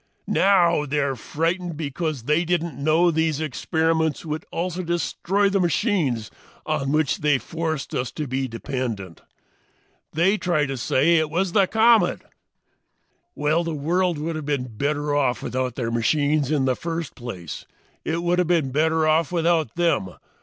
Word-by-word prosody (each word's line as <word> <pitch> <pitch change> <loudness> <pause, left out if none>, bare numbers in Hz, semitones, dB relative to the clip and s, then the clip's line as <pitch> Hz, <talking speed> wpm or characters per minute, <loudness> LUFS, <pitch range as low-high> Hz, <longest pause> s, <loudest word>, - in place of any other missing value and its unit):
Now 175 -6 +3
they're 140 -1 0
frightened 165 +6 -2
because 155 -2 -3
they 150 +6 +2
didn't 170 -3 -1
know 155 +5 +3
these 160 -2 0
experiments 160 +1 0
would 155 0 -4
also 180 +1 -2
destroy 180 +3 0
the 195 0 +1
machines 170 - 0 0.3
on 145 -3 -1
which 155 -2 +1
they 150 -1 +2
had 130 - 0
forced 160 -3 -3
us 125 0 -2
to 150 - -4
be 130 0 -2
dependent. 115 - -5 0.9
They 190 +6 +2
try 175 -6 +1
to 135 0 -4
say 145 +6 +2
it 155 -1 0
is 180 +3 0
the 195 -1 +3
comet. 220 -3 +3 1.1
"Well, 155 +3 +1
the 165 -2 -3
world 170 +4 0
would 160 +2 -3
have 155 -2 -5
been 125 -6 -2
better 145 +3 -1
off 135 -4 +1
without 130 -1 -2
their 115 -2 -2
machines 145 +4 +1
in 145 -3 +1
the 130 -1 +2
first 165 -1 -4
place. 95 - -8 0.4
It 165 +2 -2
would 175 +1 +1
have 180 - +2
been 165 -6 +1
better 160 +2 +2
off 155 +1 +2
without 165 -6 +1
them. 165 - 0
155 Hz, 160 wpm, -23 LUFS, 140-170 Hz, 1.1 s, Now